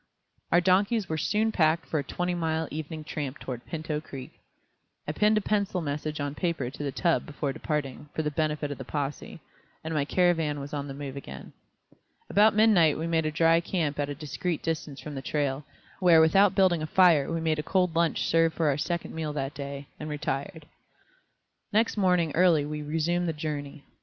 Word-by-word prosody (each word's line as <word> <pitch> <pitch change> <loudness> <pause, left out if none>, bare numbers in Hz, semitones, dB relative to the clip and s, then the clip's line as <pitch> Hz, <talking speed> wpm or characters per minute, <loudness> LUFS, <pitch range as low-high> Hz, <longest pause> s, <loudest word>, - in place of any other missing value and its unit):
Our 175 - +5
donkeys 195 +3 +2
were 160 - -2
soon 215 +7 +1
packed 160 -3 +2
for 155 - -1
a - - -2
twenty 180 +5 -2
mile 160 -2 -1
evening 155 +1 -5
tramp 150 -2 -4
toward 125 -2 -6
Pinto 155 -2 -3
Creek. 135 -4 -9 0.8
I - - 0
pinned 210 +6 +3
a - - +2
penciled 200 -3 0
message 150 +1 -3
on 145 0 -2
paper 150 -6 -2
to 145 - -7
the 140 - -2
tub 170 +3 +1
before 145 -1 -3
departing, 150 -2 -4
for 160 - -1
the 150 - -1
benefit 150 -1 -1
of 145 - -6
the - - -5
possè, 145 +4 -4 0.4
and 160 +1 -4
my 150 -2 +1
caravan 165 -2 +1
was 140 +1 -7
on 145 -1 -3
the 135 - -7
move 140 -1 -6
again. 140 - -9 0.8
About 215 +1 +5
midnight 200 -9 +5
we 160 - -3
made 165 -2 +1
a - - -1
dry 165 +2 +4
camp 165 -4 -2
at 145 0 -1
a 145 - -4
discreet 155 +3 -3
distance 155 -3 -3
from 150 - -7
the 135 - -5
trail, 140 0 -2 0.3
where 175 -4 +6
without 190 +5 +5
building 185 -4 +3
a 155 - -3
fire 165 -4 +4
we 165 - -1
made 160 -1 0
a - - +1
cold 180 +1 +1
lunch 170 -1 +1
serve 165 0 +2
for 160 -3 +2
our 140 0 0
second 170 +2 -3
meal 155 -2 -3
that 135 -1 -3
day, 140 -1 -6
and 150 - -5
retired. 150 +2 -4 1.1
Next 225 +2 +2
morning 180 -5 +2
early 165 -4 +4
we 150 0 -4
resumed 165 +3 0
the - - -1
journey. 150 -1 -5
155 Hz, 200 wpm, -27 LUFS, 145-175 Hz, 1.1 s, where